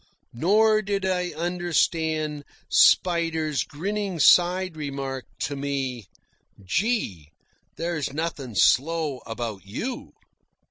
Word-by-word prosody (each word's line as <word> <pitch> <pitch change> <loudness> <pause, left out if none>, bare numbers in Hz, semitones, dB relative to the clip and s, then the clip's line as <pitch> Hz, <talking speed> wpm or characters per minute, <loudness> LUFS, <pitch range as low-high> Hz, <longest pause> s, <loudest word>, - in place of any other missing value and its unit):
Nor 215 - +3
did 200 -2 -2
I 180 -1 0
understand 160 -3 0 0.3
Spider's 165 -4 +3
grinning 195 +4 -3
side 180 +2 +4
remark 135 -3 -5 0.2
to 145 - -2
me: 135 -6 -3 0.6
"Gee! 100 - -1 0.5
There's 165 -4 -2
nothin' 145 -6 -4
slow 150 +1 +2
about 115 -4 -5
YOU." 225 - -5
160 Hz, 90 wpm, -25 LUFS, 135-180 Hz, 0.6 s, side